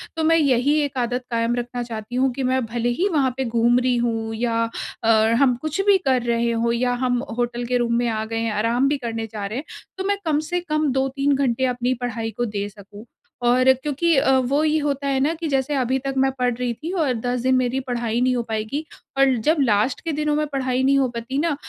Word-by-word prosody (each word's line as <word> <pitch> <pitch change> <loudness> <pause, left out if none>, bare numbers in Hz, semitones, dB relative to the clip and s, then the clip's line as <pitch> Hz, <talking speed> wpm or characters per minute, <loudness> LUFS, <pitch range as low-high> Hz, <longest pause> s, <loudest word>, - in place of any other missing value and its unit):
तो 320 - -1
मैं 325 +1 +4
यही 280 -1 +3
एक 270 - -6
आदत 245 +1 -1
कायम 230 +1 +1
रखना 245 0 -3
चाहती 230 0 -7
हूँ 260 0 +2
कि 265 0 -3
मैं 255 -1 +1
भले 235 +1 -2
ही 380 +4 +2
वहाँ 275 -6 +2
पे 265 - -1
घूम 235 +1 +3
रही 250 -1 +1
हूँ 225 -2 -1
या 230 0 -1 0.5
और 220 0 +4
हम 255 -3 +4
कुछ 310 +4 -3
भी 405 -1 +6
कर 255 -2 +3
रहे 235 0 +1
हों 230 0 0
या 245 +1 +1
हम 245 -1 +1 0.2
होटल 240 0 -1
के 250 +1 +1
रूम 235 -1 0
में 240 0 +1
आ 220 -1 -2
गए 225 +1 -4
हैं, 225 -1 -1
आराम 230 +5 +1
भी 290 - +1
करने 230 -3 -4
जा 210 -2 -6
रहे 215 +5 -4
हैं। - - -6 0.3
तो 380 - -3
मैं 405 0 +1
कम 300 -2 +2
से 355 - +1
कम 305 -2 +1
2-3 270 +2 +1
घंटे 260 -2 +1
अपनी 250 0 0
पढ़ाई 230 -2 -3
को 240 - 0
दे 205 -2 -3
सकूँ। 205 +1 -13 0.4
और 255 +2 +5
क्योंकि 295 +5 0
अ, 265 0 +4
वो 275 +4 +1
ये 310 0 +2
होता 280 -1 -2
है 270 -1 +1
ना 295 +5 +1
कि 325 0 -4
जैसे 270 +1 0
अभी 260 -1 +1
तक 275 +1 -3
मैं 270 0 +3
पढ़ 245 -1 +2
रही 245 -1 -1
थी 315 +8 -6
और 320 -9 +1
10 245 +1 -2
दिन 260 +1 +2
मेरी 255 +1 +1
पढ़ाई 240 -1 -1
नहीं 255 0 +2
हो 240 - -1
पाएगी 220 +8 -3 0.3
और 270 -2 +4
जब 315 +1 +4
लास्ट 230 0 +2
के 330 - -2
दिनों 300 0 0
में 305 0 +1
पढ़ाई 260 -1 0
नहीं 275 +1 +4
हो 265 - +2
पाती 235 +3 -5
ना 310 -1 +1
250 Hz, 245 wpm, -22 LUFS, 235-275 Hz, 0.5 s, भी